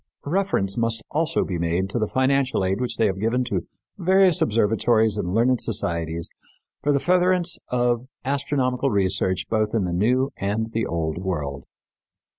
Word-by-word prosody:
Reference 150 Hz, -, 0 dB
must 115 Hz, -1 st, 0 dB
also 160 Hz, +2 st, +1 dB
be 90 Hz, -3 st, -3 dB
made 85 Hz, +3 st, 0 dB
to 120 Hz, -, -1 dB
the 110 Hz, -, 0 dB
financial 130 Hz, -4 st, +1 dB
aid 95 Hz, +5 st, -1 dB
which 125 Hz, -, -2 dB
they 115 Hz, -, +3 dB
have 95 Hz, -2 st, -1 dB
given 115 Hz, +4 st, +1 dB
to 95 Hz, -7 st, -3 dB, 0.3 s
various 185 Hz, -1 st, +4 dB
observatories 110 Hz, 0 st, +2 dB
and 95 Hz, -2 st, -2 dB
learned 120 Hz, +2 st, +3 dB
societies 85 Hz, -6 st, -1 dB, 0.5 s
for 145 Hz, -, +1 dB
the 140 Hz, -, +2 dB
furtherance 180 Hz, +1 st, +2 dB
of 120 Hz, 0 st, 0 dB, 0.2 s
astronomical 135 Hz, -1 st, 0 dB
research 95 Hz, -2 st, 0 dB
both 110 Hz, 0 st, 0 dB
in 110 Hz, -, +1 dB
the 90 Hz, -, -2 dB
New 125 Hz, +9 st, +1 dB
and 110 Hz, +3 st, -2 dB
the 115 Hz, 0 st, -1 dB
Old 80 Hz, -1 st, -2 dB
World. 75 Hz, -7 st, -4 dB
115 Hz, 160 wpm, -23 LUFS, 95-135 Hz, 0.5 s, various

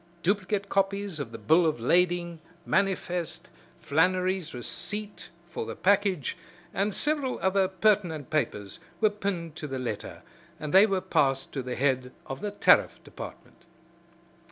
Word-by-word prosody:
Duplicate 200 Hz, +1 st, 0 dB
copies 195 Hz, -3 st, 0 dB
of 130 Hz, -5 st, -5 dB
the 115 Hz, -, -7 dB
bill 160 Hz, +11 st, +4 dB
of 155 Hz, -6 st, +1 dB
lading, 175 Hz, +5 st, +2 dB, 0.3 s
manifest, 180 Hz, -3 st, -1 dB, 0.3 s
Flannery's 180 Hz, +3 st, +1 dB
receipt 205 Hz, -, -3 dB, 0.2 s
for -, -, -4 dB
the -, -, -5 dB
package 195 Hz, -, +1 dB, 0.4 s
and 200 Hz, +3 st, 0 dB
several 285 Hz, +2 st, +1 dB
other 190 Hz, +1 st, +2 dB
pertinent 185 Hz, -, +1 dB
papers 105 Hz, -10 st, -2 dB, 0.2 s
were 215 Hz, -1 st, +4 dB
pinned 185 Hz, -6 st, -3 dB
to 150 Hz, -, -5 dB
the 135 Hz, -1 st, -4 dB
letter, 120 Hz, -5 st, -5 dB, 0.4 s
and 150 Hz, 0 st, -5 dB
they 195 Hz, +3 st, +8 dB
were 195 Hz, -2 st, 0 dB
passed 135 Hz, -6 st, +1 dB
to 135 Hz, -, -2 dB
the 125 Hz, -1 st, -4 dB
head 130 Hz, -2 st, 0 dB
of 135 Hz, -, -6 dB
the 210 Hz, -, -2 dB
Tariff 205 Hz, -, +4 dB
Department. -, -, -11 dB
180 Hz, 140 wpm, -28 LUFS, 145-200 Hz, 0.4 s, they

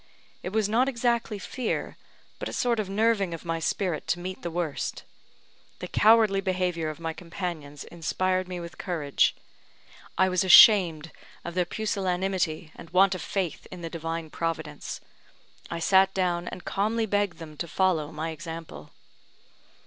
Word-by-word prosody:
It -, -, -4 dB
was 215 Hz, +1 st, +1 dB
not 240 Hz, +5 st, +2 dB
exactly 235 Hz, -3 st, 0 dB
fear, 235 Hz, +4 st, -3 dB, 0.4 s
but -, -, -4 dB
a -, -, -7 dB
sort 240 Hz, -2 st, +1 dB
of 205 Hz, -3 st, -2 dB
nerving 200 Hz, -3 st, +1 dB
of 165 Hz, -, -12 dB
my 165 Hz, 0 st, -1 dB
spirit 170 Hz, 0 st, -1 dB
to 175 Hz, -, 0 dB
meet 185 Hz, +1 st, -6 dB
the 170 Hz, -, -3 dB
worst. 165 Hz, -3 st, -3 dB, 0.7 s
The -, -, -6 dB
cowardly 215 Hz, -2 st, +4 dB
behaviour 180 Hz, -4 st, -1 dB
of 155 Hz, 0 st, -7 dB
my 165 Hz, -1 st, -3 dB
companions 165 Hz, -5 st, -6 dB
inspired 185 Hz, +2 st, -1 dB
me 180 Hz, -1 st, -5 dB
with 170 Hz, 0 st, -9 dB
courage. 155 Hz, -7 st, +1 dB, 0.8 s
I 190 Hz, +1 st, +4 dB
was 185 Hz, 0 st, +1 dB
ashamed 175 Hz, -5 st, +7 dB, 0.3 s
of -, -, -5 dB
their 180 Hz, 0 st, +1 dB
pusillanimity 185 Hz, -5 st, -1 dB
and 165 Hz, -, -11 dB
want 190 Hz, +2 st, +4 dB
of 185 Hz, -, -5 dB
faith 190 Hz, -5 st, -3 dB
in 180 Hz, -, -9 dB
the 165 Hz, -, -5 dB
Divine 165 Hz, -1 st, -4 dB
Providence. 155 Hz, -3 st, -4 dB, 0.7 s
I 170 Hz, -, -3 dB
sat 190 Hz, +3 st, +4 dB
down, 180 Hz, -2 st, 0 dB
and 180 Hz, -, -7 dB
calmly 220 Hz, +3 st, 0 dB
begged 205 Hz, -3 st, 0 dB
them 160 Hz, -2 st, -10 dB
to 170 Hz, -, -4 dB
follow 165 Hz, -4 st, +1 dB
my 160 Hz, +1 st, -4 dB
example. 160 Hz, -, -8 dB
180 Hz, 155 wpm, -27 LUFS, 165-195 Hz, 0.8 s, ashamed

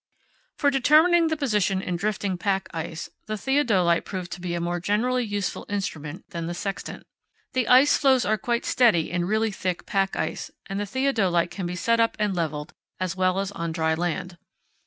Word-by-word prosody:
For 285 Hz, -2 st, +3 dB
determining 315 Hz, +6 st, +5 dB
the 315 Hz, 0 st, -1 dB
position 210 Hz, -9 st, +1 dB
in 180 Hz, -2 st, -3 dB
drifting 200 Hz, 0 st, -1 dB
pack 190 Hz, +1 st, -1 dB
ice, 165 Hz, 0 st, -5 dB, 0.2 s
the 215 Hz, 0 st, -3 dB
theodolite 210 Hz, -10 st, +2 dB
proved 185 Hz, -3 st, -6 dB
to 180 Hz, -, -6 dB
be 175 Hz, -1 st, -3 dB
a -, -, -2 dB
more 175 Hz, +1 st, -2 dB
generally 240 Hz, +7 st, +1 dB
useful 205 Hz, -3 st, -3 dB
instrument 175 Hz, -4 st, -4 dB
than 170 Hz, -1 st, -4 dB
the 175 Hz, -, -4 dB
sextant. 195 Hz, +2 st, -5 dB, 0.5 s
The 255 Hz, -3 st, 0 dB
ice 260 Hz, +4 st, +6 dB
floes 265 Hz, -3 st, +3 dB
are 215 Hz, -, +2 dB
quite 235 Hz, +3 st, -1 dB
steady 215 Hz, -11 st, +3 dB
in 175 Hz, 0 st, 0 dB
really 220 Hz, +3 st, +1 dB
thick 185 Hz, -2 st, -3 dB
pack 195 Hz, -2 st, 0 dB
ice, -, -, -3 dB, 0.2 s
and 195 Hz, +1 st, -4 dB
the 205 Hz, -, -3 dB
theodolite 195 Hz, -9 st, +1 dB
can 185 Hz, -3 st, -4 dB
be 180 Hz, -, -4 dB
set 230 Hz, +5 st, +1 dB
up 230 Hz, 0 st, +2 dB
and 210 Hz, -3 st, 0 dB
levelled 155 Hz, -3 st, -3 dB, 0.3 s
as 185 Hz, 0 st, -2 dB
well 185 Hz, 0 st, +1 dB
as 195 Hz, 0 st, -1 dB
on 170 Hz, -4 st, -4 dB
dry 160 Hz, -1 st, +1 dB
land. 175 Hz, +1 st, -3 dB
195 Hz, 190 wpm, -25 LUFS, 175-230 Hz, 0.5 s, ice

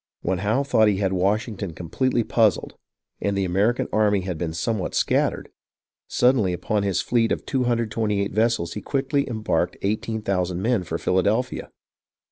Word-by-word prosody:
When 95 Hz, -1 st, 0 dB
Howe 110 Hz, +8 st, +1 dB
thought 110 Hz, -6 st, +3 dB
he 100 Hz, -2 st, +2 dB
had 95 Hz, -1 st, 0 dB
Washington 100 Hz, 0 st, -1 dB
completely 120 Hz, +9 st, 0 dB
puzzled, 110 Hz, -4 st, +1 dB, 0.5 s
and 100 Hz, -1 st, 0 dB
the 95 Hz, -, +1 dB
American 100 Hz, +7 st, +1 dB
army 105 Hz, -2 st, +3 dB
had 90 Hz, -1 st, -4 dB
been 80 Hz, 0 st, -3 dB
somewhat 100 Hz, +4 st, -2 dB
scattered, -, -, +1 dB, 0.6 s
suddenly 125 Hz, -7 st, +2 dB
upon 100 Hz, +4 st, -1 dB
his 100 Hz, -2 st, 0 dB
fleet 115 Hz, -2 st, +1 dB
of -, -, -2 dB
228 115 Hz, -5 st, 0 dB
vessels 110 Hz, -6 st, +1 dB
he 105 Hz, -, -5 dB
quickly 140 Hz, 0 st, -1 dB
embarked 110 Hz, -2 st, -1 dB
eighteen 110 Hz, +2 st, -2 dB
thousand 90 Hz, -3 st, -1 dB
men 115 Hz, -3 st, +2 dB
for 80 Hz, -1 st, -3 dB
Phila 90 Hz, +2 st, +1 dB
delphia. 110 Hz, +6 st, -1 dB
105 Hz, 155 wpm, -23 LUFS, 95-115 Hz, 0.6 s, thought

